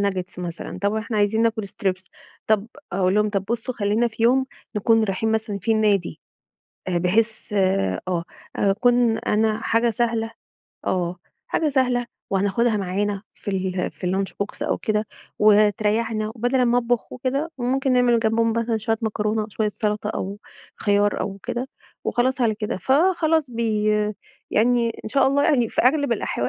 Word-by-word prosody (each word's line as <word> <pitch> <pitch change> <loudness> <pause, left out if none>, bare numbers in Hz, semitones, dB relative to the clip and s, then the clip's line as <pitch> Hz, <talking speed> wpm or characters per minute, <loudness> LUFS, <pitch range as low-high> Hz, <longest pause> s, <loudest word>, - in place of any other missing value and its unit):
ناجيتس 190 -2 -2
مثلًا 175 -1 -6
طَب 200 +1 +1
إحنا 220 +1 -3
عايزين 210 +2 +2
ناكل 220 -2 0
strips 190 -3 -3 0.4
طَب" 215 -1 +2 0.3
أقول 185 0 +2
لهم: 210 0 +2
"طَب 195 -1 -1
بصوا 235 +4 -3
خلّينا 215 +3 +1
في 225 0 -6
يوم 260 +3 +4 0.3
نكون 225 +2 +3
رايحين 215 +2 -1
مثلًا 220 -2 -1
فيه 220 +4 +1
النادي." 205 -5 +1 0.7
آآ، 180 - +1
بحيث 215 +5 0
آآ، 190 - +1
آه 175 -2 0 0.3
أكون 230 +3 +3
أنا 215 +1 +1
حاجة 230 +1 +2
سهلة 225 0 -1 0.6
آه، 180 -1 0 0.3
حاجة 315 - 0
سهلة 250 -3 +1 0.2
وهناخدها 205 +4 +1
معانا 200 +1 -1
في 205 - -6
ال 185 -1 -1
في 185 - -7
الlunch 190 +2 -1
box 205 - -9
أو - - 0
كده 215 0 -1 0.3
وتريّحنا 215 +1 +3
وبدل 245 +3 +1
امّا 245 0 +3
أطبخ 245 -1 -1
وكده، 275 +6 -2
وممكن 265 +2 +1
نعمل 245 -2 +4
جنبهم 225 0 +2
مثلًا 230 0 0
شوية 220 +1 0
مكرونة، 215 0 -1
شوية 215 0 -1
سلطة، 210 -1 -1
أو 200 -1 -4 0.4
خيار 205 0 +2
أو 195 0 -3
كده 245 +2 -3 0.4
وخلاص 255 +2 +1
على 225 -3 +3
كده. 215 +2 -3
فخلاص 315 - +2
بي 225 -3 -1 0.7
يعني 235 +1 +3
إن - - -4
شاء 270 +4 +3
الله 280 +1 +2
يعني 250 -8 +3
في - - 0
أغلب 280 +1 +3
الأحوا 125 - -1
220 Hz, 160 wpm, -23 LUFS, 200-240 Hz, 0.7 s, يوم